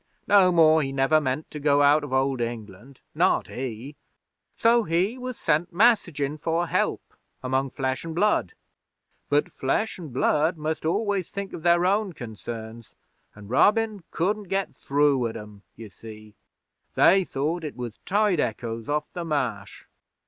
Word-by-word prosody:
No 195 -3 +5
more 160 -2 +5
he 135 -2 -3
never 135 +3 +2
meant 135 +2 -3
to 150 - -6
go 145 0 +3
out 145 +1 +4
of 145 - -7
Old 130 -1 +1
England 115 +2 -7
not - - +2
he; 130 +2 -6 0.6
so 235 +1 +4
he 180 +4 0
was 255 -1 -6
sent 165 +3 0
messagin' 170 - +2
for 165 +2 0
help - - -2 0.3
among 130 +1 0
Flesh 130 0 -3
an' 165 -1 -6
Blood. 210 - +1 0.8
But 145 0 +1
Flesh 190 +11 -2
an' 170 - -7
Blood 150 +5 +1
must 155 +1 -3
always 200 0 -1
think 200 -1 -6
of - - -7
their 170 +1 +3
own 200 0 +1
concerns, 115 -2 -8 0.4
an' 105 -1 -12
Robin 210 - +2
couldn't 205 +5 -1
get 195 +1 -2
through 140 -3 +1
at 110 - -6
'em, 105 -1 -11
ye 115 0 -10
see. 110 +1 -13 0.6
They 190 +2 +5
thought 160 +2 -3
it 150 - -6
was 120 -3 -7
tide 205 -3 +1
echoes 115 0 -3
off 150 +1 0
the 175 - -4
Marsh.' 125 -11 -3
150 Hz, 155 wpm, -25 LUFS, 130-180 Hz, 0.8 s, No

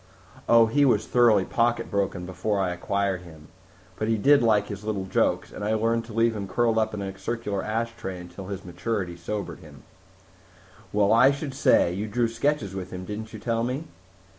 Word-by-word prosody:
"Oh, 115 -1 +7
he 145 +6 +2
was 135 - +3
thoroughly 115 -6 +4
pocket 115 0 0
broken 100 -3 -1
before 95 +3 -2
I 95 -2 0
acquired 95 +1 -1
him. 80 -3 -14 0.5
But 110 - -2
he 115 0 +2
did 140 +6 +5
like 105 -3 +3
his 100 -1 -7
little 105 -3 -2
jokes, 95 - 0
and - - -7
I 110 +1 +1
learned 115 +1 0
to 115 - -10
leave 115 0 +2
him 100 -2 -4
curled 115 +2 +1
up 110 -1 0
in 100 - -4
a 95 -1 -5
circular 110 -4 -3
ashtray 115 -3 -3
until 90 +2 -9 0.2
maturity 90 0 -3
sobered 100 +4 -5
him." - - -14 1.1
"Well, 105 0 +3
I 125 +4 +7
should 140 0 -3
say! 110 -9 +3
You 100 +4 -3
drew 120 +3 +1
sketches 115 -3 -1
with 95 -1 -5
him, 90 0 -7
didn't 110 +2 -6
you - - -7
tell 115 -1 -1
me?" 130 +5 -2
105 Hz, 190 wpm, -26 LUFS, 95-115 Hz, 1.1 s, Oh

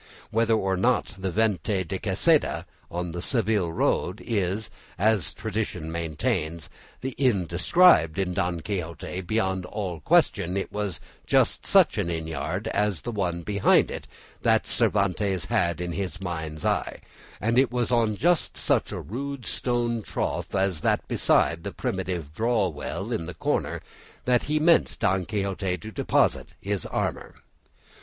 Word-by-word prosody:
Whether 115 0 +3
or 95 -3 0
not 120 +1 +1
the 95 0 -3
Venta 100 -1 +1
de - - -4
Quesada - - +2 0.2
on 90 0 -3
the 85 +1 -5
Seville 105 -5 +1
road 90 +4 0
is, 105 -2 -1 0.3
as 105 -4 +2
tradition 100 -6 -3
maintains, 80 -1 -2 0.3
the 130 - -3
inn 120 -10 +3
described 85 - +4
in 95 -2 0
"Don 90 -3 -1
Quixote," 90 -1 -4
beyond 95 -1 0
all 90 -6 -4
question 85 +5 +2
it 95 - -3
was 105 -5 -3 0.3
just - - +2
such - - +5
an - - 0
inn 80 -1 -2
yard 80 -3 -3
as 105 -4 0
the 120 - -4
one 90 -5 -2
behind 100 +1 +3
it - - -6 0.3
that - - +3
Cervantes 100 -2 +1
had 85 -6 +1
in 90 0 -3
his 95 0 -4
mind's 80 -4 -5
eye, - - -1 0.4
and 115 +3 +2
it 130 -2 +3
was 125 0 -1
on 115 -3 +2
just 170 - +1
such - - +1
a - - -4
rude 135 +3 -5
stone 120 -2 -1
trough - - -3
as 95 -4 +1
that - - +1
beside 85 0 +2
the - - -4
primitive 90 -5 -3
draw 110 0 +1
well 75 -3 -5
in 85 - -1
the 90 0 -7
corner - - -1 0.4
that 125 -1 +3
he 155 +1 0
meant 165 +2 +4
Don 95 0 +1
Quixote 95 -3 -1
to 110 +3 -9
deposit - - +1
his 100 -3 -2
armour. - - -3
95 Hz, 155 wpm, -26 LUFS, 85-110 Hz, 0.4 s, such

